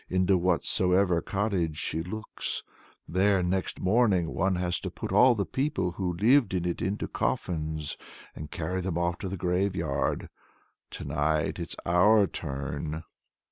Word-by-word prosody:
Into 95 +1 +3
whatsoever 90 0 +2
cottage 95 -6 -1
she 80 - -2
looks, 110 +6 -4 0.4
there, 95 +1 +2
next 95 +1 -1
morning, 95 -4 +2
one 95 0 +1
has 90 -1 -1
to - - -4
put - - -6
all 125 0 +6
the 100 -3 -1
people 135 -10 -1
who 90 0 -2
lived 115 +1 +4
in 90 -1 -1
it 85 - -2
into 100 +3 -2
coffins, 80 -3 -2 0.4
and 75 -1 -7
carry 90 +3 -3
them 90 -2 -2
off 85 0 0
to 95 - -4
the 95 - -4
graveyard. 90 -5 0 0.6
To - - -7
night 75 +2 0
it's - - -5
our 100 +5 +5
turn." 75 0 -4
90 Hz, 145 wpm, -28 LUFS, 80-95 Hz, 0.6 s, all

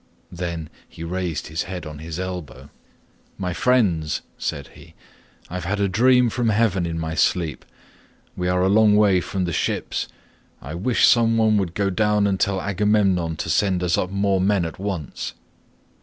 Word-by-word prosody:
Then 85 -3 -5 0.2
he 80 - -9
raised 90 -1 -3
his 80 +2 -3
head 90 -3 -5
on 75 -1 -8
his 80 +2 -6
elbow. 75 -8 -6 0.7
"'My 90 -2 -3
friends,' 90 - +1
said - - -4
he, - - -16 0.5
'I - - -12
have 90 -1 -4
had 100 +3 -1
a 100 - +2
dream 125 +4 +4
from 120 -2 0
heaven 100 -5 +1
in 80 -1 -3
my 80 0 -3
sleep. 80 -1 0 0.7
We 90 - -2
are 90 0 +2
a - - +3
long 105 +1 +5
way 100 -4 +4
from 95 +1 -2
the 85 - -3
ships; - - -2 0.5
I 70 - -8
wish 100 +8 +2
some 115 -1 +4
one 110 -1 +3
would 90 -4 -2
go 100 -1 0
down 105 +1 +2
and 95 -2 0
tell 100 -1 +1
Agamemnon 100 -4 +1
to 80 - -5
send 95 +1 +1
us 90 -1 +2
up 90 - -1
more 100 -1 +1
men 95 -2 +2
at 80 - -7
once. 95 -6 -4
95 Hz, 180 wpm, -22 LUFS, 85-105 Hz, 0.7 s, long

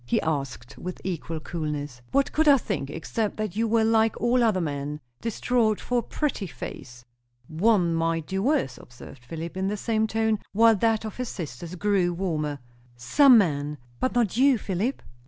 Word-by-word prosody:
he 120 - +1
asked 135 -5 -3
with 180 0 -6
equal 165 -3 -4
coolness. 150 -6 -4
"What 275 0 +2
could 315 0 +2
I 285 -1 +8
think, 195 - -3
except 200 +8 -3
that 215 -4 -3
you 225 +1 +1
were 225 0 +3
like 225 0 +2
all 240 +1 +3
other 215 -5 +3
men 145 -2 -3 0.2
distraught 230 -1 +1
for 245 -1 0
a - - -1
pretty 270 -7 -2
face." 120 -6 -9 0.4
"One 180 0 +2
might 165 -1 0
do 190 +2 -2
worse," 240 - 0
observed 125 +1 -13
Philip, 165 +6 -6
in 190 +1 -1
the 210 +1 -1
same 220 +1 0
tone, 220 -1 +1
while 225 +2 +6
that 225 +1 +1
of 215 - -6
his 250 -1 -3
sister 170 +1 -7
grew 185 -3 +1
warmer. 155 -5 -2 0.4
"Some 250 - +6
men, 150 -6 +1 0.2
but 255 - -1
not 230 -3 +1
you, 270 0 +5
Philip?" 205 +6 -2
190 Hz, 175 wpm, -26 LUFS, 155-225 Hz, 0.4 s, I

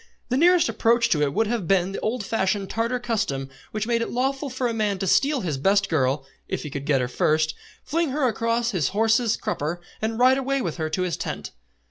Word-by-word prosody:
The 255 - +1
nearest 350 +2 +5
approach 230 +1 +2
to 150 - +2
it 145 -1 +2
would 225 +9 +1
have 220 -5 -2
been 190 -1 +2
the 195 - -4
old 220 -1 -2
fashioned 195 -2 -1
Tartar 230 +3 0
custom 140 - -2 0.2
which 215 0 -3
made 230 0 +1
it - - -2
lawful 270 +3 -1
for 255 0 -1
a 235 - -2
man 210 -3 0
to 195 - -3
steal 275 +8 +3
his 155 -8 -2
best 200 +6 +2
girl, 135 -2 +1 0.2
if - - -3
he 150 - -6
could 140 +1 -5
get 140 -4 +3
her 125 - -1
first, 155 +5 +1 0.3
fling 330 0 0
her 270 0 +1
across 230 +1 0
his 165 -8 0
horse's 225 +1 +3
crupper 175 -5 -3 0.2
and 220 +1 -1
ride 255 +2 +5
away 275 +1 0
with 175 -10 -3
her 160 -1 -2
to 185 +3 -1
his 180 -3 -2
tent. - - -5
220 Hz, 225 wpm, -24 LUFS, 170-245 Hz, 0.3 s, nearest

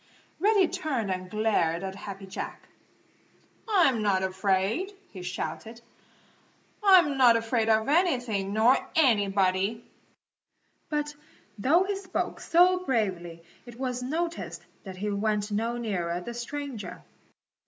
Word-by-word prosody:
Reddy 400 0 +4
turned 295 - -2
and 185 0 -4
glared 195 -5 +1
at 190 0 -4
Happy 195 0 -8
Jack. 190 - -7 1.0
"I'm 330 - +3
not 195 -3 +1
afraid!" 190 - 0 0.2
he 185 - -9
shouted. 210 +5 -5 1.0
"I'm 360 -8 +6
not 240 -3 +7
afraid 225 0 0
of 220 +1 +3
anything 245 - +1
nor 225 +5 +4 0.2
anybody!" 205 -5 +2 1.0
But 295 -1 -2 0.5
though 315 - +4
he 400 +1 -2
spoke 385 -1 -3
so 360 +2 +4
bravely 185 - -2 0.2
it 240 0 -11
was 250 -2 -2
noticed 330 +6 -4 0.2
that 190 -1 -8
he 205 +2 -2
went 210 0 -1
no 230 +3 -1
nearer 180 -7 -2
the 235 +7 -7
stranger. 250 0 -6
225 Hz, 120 wpm, -27 LUFS, 195-290 Hz, 1.0 s, not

